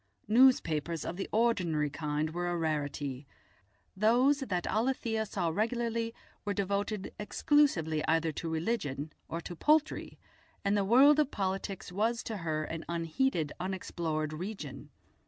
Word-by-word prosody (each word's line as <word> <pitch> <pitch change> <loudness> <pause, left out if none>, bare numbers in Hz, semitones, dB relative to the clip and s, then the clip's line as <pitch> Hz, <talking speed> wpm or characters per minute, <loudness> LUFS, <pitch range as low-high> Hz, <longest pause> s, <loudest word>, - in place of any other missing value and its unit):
Newspapers 170 - +3
of - - -3
the 195 - -4
ordinary 180 -10 +1
kind 150 0 -2
were 175 +1 -2
a 175 - -1
rarity; 145 -4 -2 0.7
those 245 +8 +4
that 185 -10 -2
Alethia 225 -2 0
saw 180 -4 -1
regularly 230 +4 -1 0.3
were 205 -1 -2
devoted 200 +1 -2
exclusively 205 - +2
either 165 0 +2
to 165 +2 -4
religion 160 - -2 0.2
or 165 - -3
to 175 - -7
poultry, 305 - +1 0.5
and 200 +1 +3
the 200 - +2
world 270 +9 +6
of 295 -3 +3
politics 195 -2 -3
was 225 +5 0
to 220 - -4
her 155 -3 -2
an 160 +1 -5
unheeded 170 - 0
unexplored 170 -4 -2
region. 155 -6 -6
185 Hz, 135 wpm, -31 LUFS, 160-225 Hz, 0.7 s, world